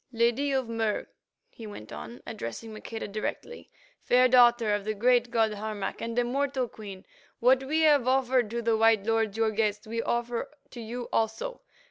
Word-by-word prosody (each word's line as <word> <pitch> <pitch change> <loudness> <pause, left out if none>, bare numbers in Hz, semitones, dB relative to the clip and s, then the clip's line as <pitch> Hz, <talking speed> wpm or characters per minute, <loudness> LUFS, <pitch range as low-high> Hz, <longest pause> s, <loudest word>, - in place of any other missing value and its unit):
"Lady 240 +4 +1
of 265 -3 0
Mur," 225 -2 -1 0.5
he 225 - -10
went 110 - -10
on, 240 - -9
addressing 220 - -6
Maqueda 220 +1 -6
directly, 215 - -5 0.3
"fair 250 +1 +4
daughter 240 -3 +5
of 205 -1 -1
the 215 +1 -2
great 245 +2 +3
god 225 -2 +1
Harmac 210 -1 -4
and 230 +1 -4
a 245 - +4
mortal 265 +1 -1
queen, 200 -4 -10 0.3
what 255 +2 +4
we 310 +4 +1
have 290 -5 +4
offered 255 -3 +2
to 235 +1 -3
the 230 0 +2
white 220 -2 +3
lords, 225 -2 0
your 225 -1 +2
guests, 210 -1 -1
we 230 +1 -3
offer 240 +3 -2 0.2
to 240 - -8
you 235 +2 -6
also. 225 - -1
230 Hz, 175 wpm, -28 LUFS, 215-250 Hz, 0.5 s, daughter